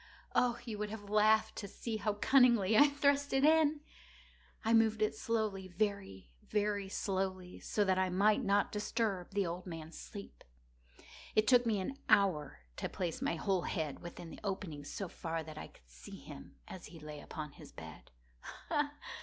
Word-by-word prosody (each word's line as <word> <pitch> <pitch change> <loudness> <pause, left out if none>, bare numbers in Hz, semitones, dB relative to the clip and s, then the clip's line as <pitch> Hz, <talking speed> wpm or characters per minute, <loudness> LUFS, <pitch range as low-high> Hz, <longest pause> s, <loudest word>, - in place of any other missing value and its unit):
Oh, 240 -1 +3
you 220 -3 -5
would 210 0 -2
have 205 -1 -8
laughed 215 +1 +4
to 200 - -4
see 220 +3 -4
how 210 0 0
cunningly 235 -3 +4
I 290 +6 +8
thrust 285 0 +1
it 270 +1 +4
in! 310 -1 +4 0.8
I 225 - +3
moved 220 -1 +4
it 215 - +1
slowly—very, 195 - -2
very 205 -2 -1
slowly, 190 -2 -2
so 210 - 0
that 185 -1 +2
I 190 0 +2
might 205 +7 +3
not 200 -1 +2
disturb 210 -3 -1
the 200 -1 0
old 175 +2 -5
man's 165 -2 -7
sleep. 200 -1 -10 0.9
It 215 - +5
took 245 -2 +5
me 215 -3 +2
an 270 +9 -4
hour 185 - +3 0.2
to - - -3
place 175 -3 -3
my - - 0
whole 190 +2 0
head 155 -5 -3
within 170 -1 -9
the - - -10
opening 190 -7 -4
so 195 +6 -4
far 165 -1 -4
that 155 -1 -9
I - - -7
could - - -23
see - - -11
him - - -11
as 185 - -9
he 165 - -12
lay 150 -1 -8
upon 150 0 -7
his - - -13
bed. - - -11
200 Hz, 170 wpm, -34 LUFS, 175-220 Hz, 0.9 s, I